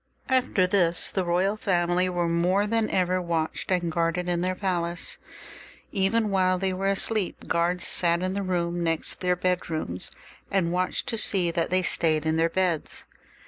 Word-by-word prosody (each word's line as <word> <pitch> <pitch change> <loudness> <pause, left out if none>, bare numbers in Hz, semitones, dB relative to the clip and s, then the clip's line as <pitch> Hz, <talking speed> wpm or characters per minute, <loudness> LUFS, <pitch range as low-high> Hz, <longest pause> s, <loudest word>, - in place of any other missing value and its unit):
After 255 -8 +2
this 175 -3 +2
the 190 - -1
royal 180 +4 +1
family 180 -2 +1
were 175 -1 -1
more 180 +4 +2
than 225 0 0
ever 185 0 +1
watched 165 -2 -2
and 175 -2 +1
guarded 170 +2 -1
in 175 -1 0
their 185 +1 -1
palace. 175 -3 -2 0.7
Even 205 +2 +1
while 185 -1 +2
they 190 0 -1
were 195 +1 -2
asleep, 195 0 0
guards 175 +1 0
sat 170 0 +3
in 185 0 -1
the 200 - -2
rooms 175 -2 -1
next 165 -1 -1
their 180 -1 +1
bedrooms, 165 - -3 0.4
and 175 -3 0
watched 180 0 -1
to 225 - -1
see 185 -5 +2
that 165 0 -1
they 185 0 +2
stayed 160 -3 +1
in 160 0 +1
their 165 +1 +2
beds. 175 -3 -2
180 Hz, 170 wpm, -26 LUFS, 170-190 Hz, 0.7 s, sat